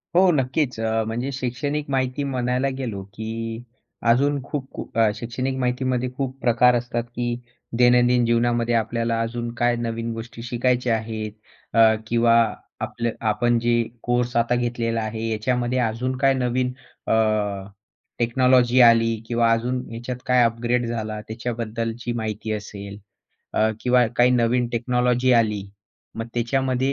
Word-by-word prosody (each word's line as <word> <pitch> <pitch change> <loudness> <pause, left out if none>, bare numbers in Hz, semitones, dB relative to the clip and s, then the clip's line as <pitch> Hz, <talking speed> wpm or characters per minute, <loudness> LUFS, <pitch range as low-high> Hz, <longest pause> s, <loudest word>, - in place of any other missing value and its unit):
हो, 185 +1 +6
नक्कीच. 135 -3 0
अ, 110 0 0
म्हणजे 120 +5 -2
शैक्षणिक 140 +3 -3
माहिती 130 +1 0
म्हणायला 125 -1 0
गेलो, 115 -7 -4
की 115 +2 -5 0.5
अजून 140 +3 +2
खूप 140 -1 -5
खूप - - -8
अ, 115 -1 +5
शैक्षणिक 125 +3 -3
माहितीमध्ये 125 0 0
खूप 135 -1 -3
प्रकार 120 +1 +4
असतात 120 0 -2
की 120 0 -1 0.4
दैनंदिन 125 0 +4
जीवनामध्ये 120 0 +1
आपल्याला 115 +1 0
अजून 120 +1 -3
काय 120 0 +2
नवीन 115 0 -3
गोष्टी 115 +1 -8
शिकायच्या 120 0 +1
आहेत 110 -1 -5 0.5
अ, 110 -1 +7
किंवा 115 0 +3 0.5
आपलं 120 0 -2
आपल 115 - -9
आपण 120 +3 +2
जे 120 0 +2 0.2
कोर्स 120 0 0
आता 115 +1 +2
घेतलेला 120 -1 -1
आहे, 110 +1 -3
याच्यामध्ये 125 +3 0
अजून 125 +2 -1
काय 135 0 +3
नवीन 125 0 0 0.4
अ, - - +2 1.1
टेक्नॉलॉजी 125 +1 +3
आली 115 -1 +5
किंवा 115 -1 +2
अजून 125 +2 0
याच्यात 120 +2 -5
काय 125 -1 +4
अपग्रेड 120 +1 +1
झाला 110 -2 -3
त्याच्याबद्दलची 115 0 -4
माहिती 110 0 -4
असेल. 100 -1 -6 0.6
अ, 110 - +3
किंवा 125 -1 +4
काही 120 +1 +5
नवीन 120 0 +2
टेक्नॉलॉजी 125 +1 +2
आली. 110 -4 +2 0.5
मग 115 0 -4
त्याच्यामध्ये 130 +2 0
120 Hz, 140 wpm, -23 LUFS, 115-125 Hz, 1.1 s, अ